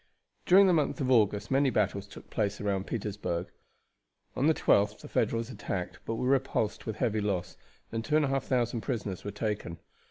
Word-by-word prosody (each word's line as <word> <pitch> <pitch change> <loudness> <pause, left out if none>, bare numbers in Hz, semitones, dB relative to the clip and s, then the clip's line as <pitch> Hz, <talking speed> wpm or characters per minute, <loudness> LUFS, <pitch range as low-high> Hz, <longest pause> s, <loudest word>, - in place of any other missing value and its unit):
During 195 +2 +8
the 185 - +4
month 155 0 +1
of 130 -2 0
August 105 -3 +3
many 135 +1 +4
battles 125 - 0
took - - -13
place 105 -1 -1
round 100 -2 -1
Petersburg. 100 -6 -3 0.8
On 135 +4 +2
the 160 - +5
12th 105 +1 +2
the - - -9
Federals 115 +2 0
attacked, 90 -7 -4
but 115 - -1
were 125 - -2
repulsed 130 -6 0
with 110 - -2
heavy 110 -2 0
loss, 100 -4 -2 0.4
and 115 0 -2
2,500 135 -5 +1
prisoners 105 -8 -3
were - - -4
taken. 105 -4 -3
115 Hz, 165 wpm, -30 LUFS, 105-130 Hz, 0.8 s, During